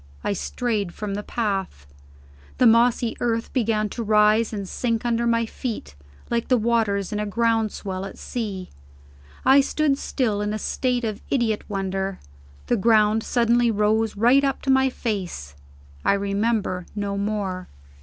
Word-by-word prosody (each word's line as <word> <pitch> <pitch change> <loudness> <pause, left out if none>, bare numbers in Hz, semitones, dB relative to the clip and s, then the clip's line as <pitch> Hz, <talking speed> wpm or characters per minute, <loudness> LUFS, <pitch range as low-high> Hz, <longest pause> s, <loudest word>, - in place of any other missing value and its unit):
I - - 0
strayed 210 -2 -2
from 210 -2 -4
the 205 - -3
path. 195 - -3 0.7
The 250 - +4
mossy 235 0 +4
earth 230 -1 -1
began 225 -4 +1
to 235 - -5
rise 215 +1 +3
and 200 -3 -4
sink 230 +2 -2
under 235 0 +1
my 230 0 +2
feet, 225 - -5 0.4
like 235 -1 0
the 255 - +4
waters 220 -4 0
in 210 - -1
a 210 - -1
ground 225 0 +1
swell 190 -2 -5
at 195 - -9
sea. 200 -6 -5 0.7
I 270 +1 +7
stood 280 0 0
still, 220 -6 -1
in 210 +1 -1
a - - -1
state 250 +3 -1
of 215 -2 -3
idiot 230 -5 0
wonder. 195 -1 -2 0.5
The 240 - +1
ground 215 +1 +4
suddenly 235 +1 +2
rose 215 0 +1
right 245 +6 +5
up 275 -1 -1
to 270 - +2
my 265 0 +4
face. 185 - -4 0.5
I - - +4
remember 200 -2 -1
no 200 -1 -2
more. 200 -3 -2
220 Hz, 155 wpm, -23 LUFS, 200-235 Hz, 0.7 s, I